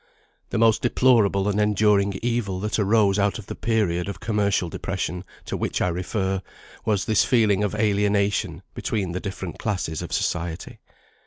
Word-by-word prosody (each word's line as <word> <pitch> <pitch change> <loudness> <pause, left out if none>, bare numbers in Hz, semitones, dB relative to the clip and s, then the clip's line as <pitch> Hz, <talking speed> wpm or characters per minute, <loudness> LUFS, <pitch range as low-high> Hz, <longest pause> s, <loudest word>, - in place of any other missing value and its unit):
The - - -2
most 115 -1 +4
deplorable 115 -6 +3
and 105 +1 +1
enduring 105 -1 +2
evil 115 -6 -1
that 105 +1 -1
arose 105 -1 +3
out 100 0 +1
of 110 - -9
the - - -6
period 100 -6 0
of 100 - -6
commercial 100 -4 0
depression 90 +1 -4 0.2
to - - -4
which - - -2
I 90 - +1
refer, 95 +2 -2 0.4
was 105 -4 0
this 110 -2 +3
feeling 105 -5 +3
of 105 0 -1
alienation 100 -3 +1
between 100 -6 -2
the 90 - -3
different 95 -3 -6
classes 90 -7 -2
of - - -7
society. 85 -1 -2
100 Hz, 160 wpm, -24 LUFS, 95-105 Hz, 0.4 s, most